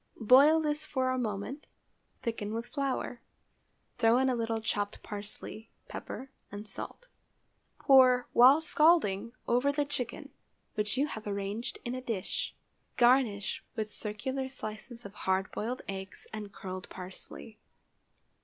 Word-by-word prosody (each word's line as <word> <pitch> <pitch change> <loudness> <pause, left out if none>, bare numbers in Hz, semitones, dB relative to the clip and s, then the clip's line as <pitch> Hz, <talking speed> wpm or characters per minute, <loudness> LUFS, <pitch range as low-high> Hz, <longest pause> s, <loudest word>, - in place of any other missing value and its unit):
Boil 275 +8 +7
this 300 -1 0
for 260 -4 0
a 255 - 0
moment, 225 +5 -4 0.6
thicken 225 -2 -2
with 230 +1 -3
flour, 265 -3 -2 0.8
throw 230 0 +5
in 260 0 +3
a - - +1
little 225 -1 -1
chopped 205 -2 -2
parsley, 210 +1 -7 0.2
pepper, 270 - -7 0.2
and 205 +1 -7
salt; - - -6 0.7
pour, 255 -2 +6
while 260 +5 +8
scalding, 300 - +3 0.2
over 250 +4 +3
the 290 0 0
chicken, 285 -4 -4 0.4
which 210 +4 0
you 280 - +3
have 220 -8 -6
arranged 200 +3 -3
in 240 - -2
a 255 - -4
dish; 225 -7 -3 0.4
garnish 240 -5 +3
with 215 -2 -3
circular 260 +6 -3
slices 235 -1 -8
of 200 - -8
hard 190 -1 0
boiled 245 +4 -3
eggs 190 -1 -6
and 210 -2 -6
curled 185 -2 -7
parsley. 190 +3 -9
230 Hz, 135 wpm, -31 LUFS, 210-265 Hz, 0.8 s, while